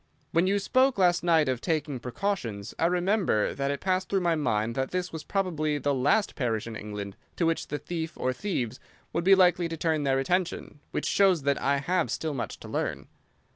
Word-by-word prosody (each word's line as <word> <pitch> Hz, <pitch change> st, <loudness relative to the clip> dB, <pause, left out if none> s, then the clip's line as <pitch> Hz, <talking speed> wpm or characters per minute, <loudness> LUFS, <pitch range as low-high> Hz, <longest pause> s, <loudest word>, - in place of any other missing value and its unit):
When 170 Hz, +3 st, +3 dB
you 200 Hz, +1 st, +2 dB
spoke 255 Hz, +5 st, +2 dB
last 180 Hz, -2 st, +3 dB
night 165 Hz, -3 st, +4 dB
of 130 Hz, -2 st, -1 dB
taking 155 Hz, -5 st, -1 dB
precautions 120 Hz, -, -3 dB
I 165 Hz, -, +4 dB
remember 180 Hz, -, +1 dB
that 140 Hz, 0 st, -2 dB
it 140 Hz, 0 st, -2 dB
passed 185 Hz, 0 st, 0 dB
through 195 Hz, -1 st, +1 dB
my 170 Hz, -1 st, +2 dB
mind 115 Hz, -7 st, 0 dB
that 130 Hz, +2 st, -1 dB
this 180 Hz, -1 st, -3 dB
was 160 Hz, -, -5 dB
probably 155 Hz, -6 st, -1 dB
the 145 Hz, 0 st, 0 dB
last 145 Hz, +11 st, +2 dB
parish 115 Hz, -5 st, -1 dB
in 115 Hz, -1 st, -6 dB
England 105 Hz, -2 st, -6 dB, 0.2 s
to 170 Hz, -, 0 dB
which 165 Hz, 0 st, 0 dB
the 150 Hz, -, -3 dB
thief 160 Hz, +2 st, -4 dB
or 130 Hz, -, 0 dB
thieves 125 Hz, -, -3 dB, 0.3 s
would 170 Hz, -, 0 dB
be 195 Hz, +2 st, +7 dB
likely 180 Hz, -2 st, +4 dB
to 165 Hz, -, -4 dB
turn 160 Hz, -1 st, 0 dB
their 135 Hz, -2 st, +2 dB
attention—which 170 Hz, 0 st, -2 dB
shows 190 Hz, -6 st, +3 dB
that 140 Hz, 0 st, +1 dB
I 140 Hz, +1 st, +2 dB
have 170 Hz, +4 st, 0 dB
still 160 Hz, -2 st, -2 dB
much 130 Hz, -, -4 dB
to -, -, -9 dB
learn." -, -, -3 dB
160 Hz, 205 wpm, -27 LUFS, 135-180 Hz, 0.3 s, be